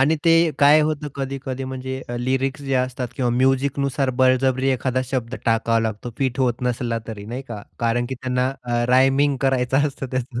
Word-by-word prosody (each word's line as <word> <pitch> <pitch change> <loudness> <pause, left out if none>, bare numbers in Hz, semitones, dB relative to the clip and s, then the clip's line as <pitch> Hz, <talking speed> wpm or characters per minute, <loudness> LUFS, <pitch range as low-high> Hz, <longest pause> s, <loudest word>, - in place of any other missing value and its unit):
आणि 150 +4 +3
ते 165 - +5 0.3
काय 145 +2 +6
होतं 150 -1 -1
कधी-कधी 135 -1 -4
म्हणजे 130 0 -5 0.2
लिरिक्स 130 +3 -1
जे 135 -1 -2
असतात 125 -1 -1
किंवा 125 -2 0
म्युझिकनुसार 135 +1 +1
बळजबरी 130 +1 +3
एखादा 130 0 0
शब्द 125 -2 -3
टाकावा 115 0 +2
लागतो 110 +1 -3
फिट 130 -1 -1
होत 125 -1 0
नसला 120 -1 -1
तरी 105 -2 -7
नाही 120 +4 -5
का. 105 -3 -6 0.2
कारण 120 +1 0
की 130 - -3
त्यांना 125 0 -1
अ, 120 -1 -1
रायमिंग 135 +2 +4
करायचं 135 +1 +2
असतं 135 -1 -7
त्याचं. 130 -1 -3
130 Hz, 175 wpm, -22 LUFS, 120-135 Hz, 0.3 s, काय